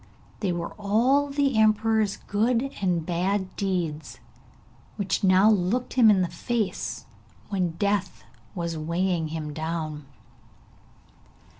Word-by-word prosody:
They 195 -4 0
were 170 -1 -4
all 245 +8 +2
the 275 -4 +1
emperor's 215 -1 +2
good 235 +5 0
and 175 -4 0
bad 185 +3 -1
deeds, 175 -6 -3 0.8
which 200 -1 -1
now 190 +2 +5
looked 210 +5 0
him 245 -4 +6
in 195 -3 +4
the - - 0
face 210 +5 -3 0.4
when 185 -4 -1
Death 200 -1 -1 0.3
was 170 -1 -3
weighing 170 +1 -1
him 155 -1 -5
down. 155 -2 -4
190 Hz, 115 wpm, -26 LUFS, 170-215 Hz, 0.8 s, him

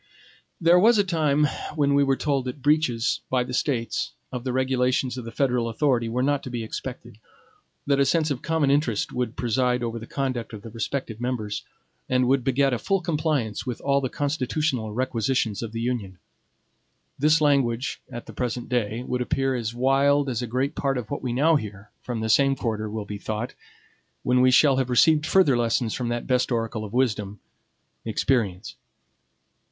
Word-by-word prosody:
There 175 +1 +5
was 225 +4 +5
a 205 - +4
time 155 -5 +2 0.3
when 140 -2 +2
we 140 0 +4
were 135 -1 +2
told 140 -3 0
that 130 +2 -6
breaches, 145 -6 +2
by 130 -1 +2
the 125 - -7
States, 130 -1 -1 0.2
of 125 -2 -5
the 130 - -2
regulations 130 0 +1
of 125 -3 -6
the 115 - -6
federal 125 -2 0
authority 120 -1 +1
were 125 +3 -1
not 145 0 +1
to - - -7
be 120 -2 -4
expected; 120 0 -7 0.7
that 140 -1 +2
a 140 - +4
sense 155 +2 +1
of 130 - -3
common 160 -4 +1
interest 140 -7 +1
would 125 -1 -2
preside 125 0 0
over 115 0 -3
the 115 - -10
conduct 130 -5 -3
of 105 -1 -8
the 115 - -9
respective 115 0 -4
members, 120 -4 -3 0.5
and 125 -1 +2
would 135 0 +2
beget 135 +1 +2
a 120 - -1
full 195 +8 +1
compliance 150 - -1
with 125 - -3
all 140 0 +2
the 130 - -2
constitutional 140 -4 -1
requisitions 115 -2 -1
of 115 -2 -5
the 115 - -5
Union. 115 -6 -3 1.0
This 150 +3 +4
language, 135 -4 +1
at 120 - -7
the - - -10
present 125 -1 -3
day, 120 -1 -1
would 125 0 -2
appear 135 +2 0
as 120 -2 -3
wild 140 +2 +3
as 120 -2 -2
a 125 - -3
great 130 +5 -1
part 135 -3 -1
of 120 -4 -6
what 140 - -3
we 125 - -2
now 150 +6 +4
hear 105 -4 -8
from 120 -3 -4
the 110 - -1
same 135 +4 +4
quarter 110 -4 -3
will 105 -1 -4
be 105 0 -6
thought, 110 +3 -4 0.7
when 125 0 +3
we 130 - +6
shall 135 +1 +5
have 130 -1 0
received 155 +5 +4
further 180 -9 +4
lessons 115 -1 0
from 125 - -3
that 120 0 -2
best 125 0 +1
oracle 115 -2 -1
of 105 - -7
wisdom, 105 -5 -1 0.6
experience. 110 -4 -1
125 Hz, 190 wpm, -25 LUFS, 115-140 Hz, 1.0 s, we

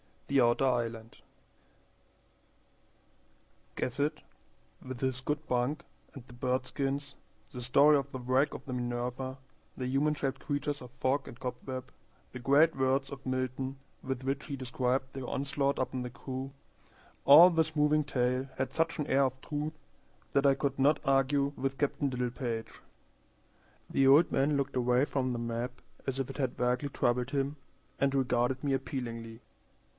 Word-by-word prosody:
The 140 -1 +4
Outer 120 +3 +3
Island 115 -3 -1 2.6
GAFFETT 140 +4 -1 0.6
WITH 130 -2 -7
HIS 130 -1 0
good 150 +3 -3
bunk 125 +4 0 0.3
and 135 -5 -10
the 125 - -14
bird 130 +1 -1
skins, 140 0 -3 0.4
the 125 - -7
story 140 +5 +5
of 140 0 -3
the - - -4
wreck 130 +3 +1
of 135 - -8
the 130 - -6
Minerva, 125 +2 -3 0.4
the 130 - -3
human 140 +4 +2
shaped 135 -2 -2
creatures 145 0 -2
of 125 - -9
fog 130 +3 -1
and 125 -4 -9
cobweb, 130 0 -5 0.4
the 130 - -7
great 145 +6 +4
words 135 +1 +1
of 135 -1 -9
Milton 130 +1 -2 0.2
with 130 -1 -4
which 135 +2 -2
he 140 - -4
described 130 0 -1
their 135 -2 -5
onslaught 140 0 0
upon 130 0 -2
the 125 - -4
crew, 130 +2 -6 0.7
all 155 +6 +10
this 160 -2 0
moving 150 0 +3
tale 125 0 0
had 130 0 -1
such 165 +3 0
an 150 - -2
air 135 +1 +4
of 130 0 -3
truth 150 +1 -4 0.5
that 140 0 +3
I 135 - +5
could 135 0 -2
not 145 +3 +4
argue 135 +1 +2
with 135 +1 -2
Captain 145 0 0
Littlepage. 125 -2 -3 1.1
The 135 - +3
old 145 +5 +6
man 145 +2 +2
looked 140 -1 -1
away 125 +1 +3
from 130 -3 -1
the 120 - -3
map 120 +2 -4 0.3
as 135 0 -2
if 135 0 -2
it 135 - -7
had 130 -3 -1
vaguely 125 +3 0
troubled 125 0 0
him, 140 +1 -1 0.4
and 140 0 +2
regarded 125 -1 +1
me 140 -2 +1
appealingly. 115 -4 -4
135 Hz, 160 wpm, -31 LUFS, 125-140 Hz, 2.6 s, all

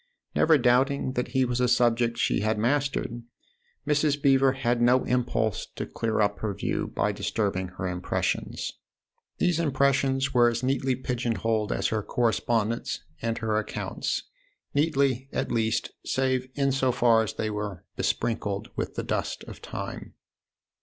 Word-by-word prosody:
Never 160 -1 +5
doubting 130 +2 +2
that 125 -1 -1
he 130 +1 +1
was 125 0 -1
a 125 - +3
subject 120 -1 +2
she - - +1
had 110 +2 0
mastered, 125 0 0 0.6
Mrs. 150 -1 +2
Beever 135 -1 +4
had 120 -2 0
no 125 +2 +4
impulse 120 -4 0
to - - -3
clear 110 -1 -1
up 105 0 +1
her 105 -3 -2
view - - -2
by - - 0
distributing 95 -4 -1
her 95 - -2
impressions. 90 0 -2 0.7
These 175 -2 +2
impressions 135 -2 +2
were 120 -2 +6
as 120 +1 -3
neatly 130 0 +1
pigeon 125 -2 -2
holed 110 -2 0
as - - 0
her 110 -1 0
correspondence 115 0 0 0.2
and 115 0 -1
her 110 -1 0
accounts 110 - -3 0.5
neatly, 140 -3 +1
at - - -2
least, 115 -1 0
save 130 -1 0
in 140 -1 +2
so 130 -1 +2
far 120 -2 +4
as 110 -1 -2
they 110 -1 -2
were 105 -3 -5
besprinkled 105 -4 -1
with - - -3
the - - -2
dust - - -2
of - - -10
time. - - -7
120 Hz, 155 wpm, -27 LUFS, 110-135 Hz, 0.7 s, were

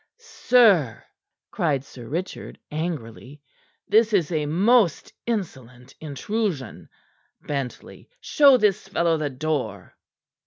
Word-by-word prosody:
"Sir," 225 - +2 0.5
cried 145 -5 -1
Sir 120 -4 -12
Richard 175 +8 -5
angrily. 145 -4 -6 0.5
"This 220 +1 +3
is 180 -5 +1
a 155 -3 -1
most 195 - +2
insolent 130 - -5
intrusion. 155 - -4 0.5
Bentley, 140 -4 -6
show 280 - +5
this 210 -3 +1
fellow 170 -4 +1
the 150 -2 -2
door." 130 - -4
155 Hz, 100 wpm, -23 LUFS, 135-205 Hz, 0.5 s, show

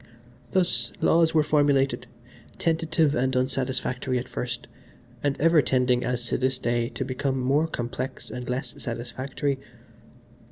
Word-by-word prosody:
Thus, 145 -10 +2
laws 165 0 +4
were 155 - +5
formulated, 145 -2 +2 0.5
tentative 160 -2 +2
and 130 0 +1
unsatisfactory 130 0 -1
at 125 +1 -3
first, 120 -1 -4 0.6
and 140 -1 0
ever 165 0 +5
tending, 125 -1 +2
as 120 -1 -1
to - - 0
this 130 0 +1
day, 120 -1 0
to 135 - -4
become 130 +1 -1
more 140 +5 +2
complex 125 -1 -4
and 125 0 -6
less 125 0 -3
satisfactory. 130 +4 -3
130 Hz, 130 wpm, -26 LUFS, 125-145 Hz, 0.6 s, were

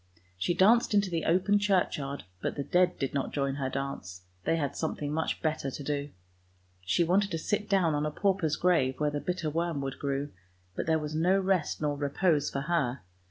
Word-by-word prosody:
She 130 - 0
danced 220 +3 +4
into 200 -2 +2
the 165 -2 -1
open 190 +4 +3
churchyard, 175 -8 0 0.2
but - - -2
the 140 - -2
dead 180 +3 +2
did 135 - -2
not 140 -1 -1
join 140 -1 -1
her 135 -2 -1
dance, 130 -10 -5 0.2
they - - +2
had 140 -4 -2
something 150 -2 -2
much 160 +1 -2
better 155 -3 0
to 140 - -7
do. 145 0 -2 0.7
She 90 - +2
wanted 195 +4 +2
to 165 - -2
sit 210 +6 -2
down 185 -5 +3
on 150 +1 0
a - - -3
pauper's 185 -3 +1
grave 155 -7 +2
where 150 -1 +1
the 145 - -2
bitter 175 -4 -2
worm 165 -1 -1
wood 135 -1 -4
grew, 140 +1 -2 0.4
but - - -3
there 160 -1 +3
was 150 -1 -4
no 175 +5 +3
rest 185 -6 0
nor 145 -1 +1
repose 145 +2 +1
for 140 - -3
her. 140 - -1
155 Hz, 205 wpm, -29 LUFS, 140-180 Hz, 0.7 s, danced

